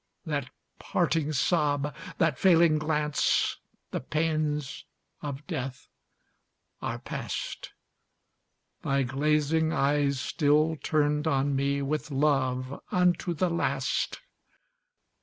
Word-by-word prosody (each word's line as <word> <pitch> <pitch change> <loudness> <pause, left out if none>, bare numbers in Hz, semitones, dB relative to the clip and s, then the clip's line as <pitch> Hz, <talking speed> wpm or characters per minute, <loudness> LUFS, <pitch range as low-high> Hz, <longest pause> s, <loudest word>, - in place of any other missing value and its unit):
That 145 -5 -2 0.3
parting 155 -2 0
sob, 145 -1 +1 0.2
that 160 -7 +1
failing 170 -4 +5
glance 150 -1 +1 0.3
The - - -2
pains 150 -1 -1 0.4
of 145 0 -5
death 130 -1 -5 0.9
are - - -3
past! - - -5 1.1
Thy 140 0 +1
glazing 150 +4 +1
eyes 140 -1 +1
still 155 +3 +2
turned 150 0 +1
on 140 -1 +1
me 140 +1 0
With 150 +2 -2
love 135 -2 0
unto 180 -1 +2
the 175 +3 +1
last! 170 - -1
150 Hz, 95 wpm, -28 LUFS, 140-155 Hz, 1.1 s, failing